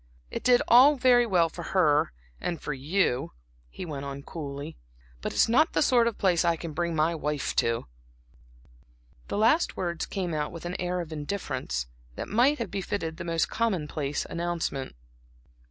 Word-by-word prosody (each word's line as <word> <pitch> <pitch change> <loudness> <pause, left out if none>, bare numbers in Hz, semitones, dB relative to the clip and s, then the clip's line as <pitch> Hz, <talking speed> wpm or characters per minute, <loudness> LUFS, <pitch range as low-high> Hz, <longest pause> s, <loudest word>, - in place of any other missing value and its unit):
"It - - -4
did 245 -1 +5
all 265 +5 +7
very 245 -2 +4
well 175 -5 +3
for 170 +2 -8 0.2
her 150 -4 +4 0.3
and 170 -3 -3
for 150 - -4
you," 140 -1 0 0.4
he 180 - -7
went 145 -4 -5
on, 140 0 -6
coolly, 145 0 -6 0.5
"but - - -3
it's - - +3
not 275 +8 +3
the - - +3
sort 240 -4 +4
of 230 - -2
place 180 -4 +2
I 170 -1 +3
can 165 -1 -7
bring 170 +1 -1
my 160 +2 +2
wife 150 -3 -2
to." 115 0 +1 1.4
The - - -3
last 235 +11 +3
words 170 -2 -2
came 185 -4 -3
out 150 -1 -2
with 170 0 -9
an 175 +1 -3
air 180 0 -1
of 165 -2 -7
indifference, 140 - -3 0.3
that - - -5
might 255 +7 +3
have 230 -6 -4
befitted 185 -4 -3
the - - -5
most 165 -1 0
commonplace 155 -10 -1
announcement. 170 - -3
170 Hz, 170 wpm, -27 LUFS, 150-200 Hz, 1.4 s, all